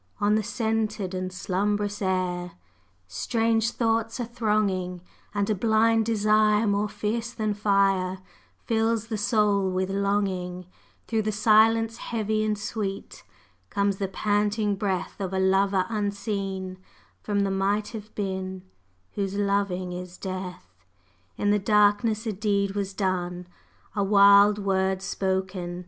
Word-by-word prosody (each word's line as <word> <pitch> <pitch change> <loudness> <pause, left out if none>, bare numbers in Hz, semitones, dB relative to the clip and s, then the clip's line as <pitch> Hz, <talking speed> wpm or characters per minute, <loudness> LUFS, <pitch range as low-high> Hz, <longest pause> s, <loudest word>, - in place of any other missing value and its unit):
On 205 +1 +2
the 215 - +3
scented 220 -3 -2
and 185 0 -3
slumbrous 205 +3 -1
air, 180 -2 -1 0.5
Strange 225 - 0
thoughts 225 0 -1
are 240 - -1
thronging; 210 -6 -1 0.3
And 200 0 +1
a 215 - +2
blind 225 +2 +2
desire 215 0 +3
more 205 0 +1
fierce 230 +3 -3
than 215 -3 -1
fire 195 -2 +2 0.5
Fills 225 -1 0
the 220 - -2
soul 205 -2 +2
with 185 +1 -1
longing; 195 -3 -1 0.4
Through 225 -1 0
the 215 0 -1
silence 225 +2 +4
heavy 215 -2 -1
and 215 -1 0
sweet 200 -2 -5 0.5
Comes 200 -1 0
the 195 - -2
panting 205 +1 0
breath 195 0 -3
Of 190 -1 -3
a 190 - 0
lover 190 0 +2
unseen 200 -3 -3 0.4
from 205 -1 0
the 200 -1 0
Might 200 +2 0
Have 215 -2 -9
Been, 190 -2 -4 0.5
Whose 195 -1 -3
loving 200 -3 0
is 180 0 -7
Death! 180 - -7 0.5
In 205 - +1
the 210 - +3
darkness 210 +2 +2
a 220 - -1
deed 200 0 0
was 195 -1 -3
done, 180 -2 -2 0.5
A 200 - +1
wild 200 +1 +6
word 190 -1 0
spoken! 190 -2 -2
200 Hz, 130 wpm, -26 LUFS, 190-215 Hz, 0.5 s, wild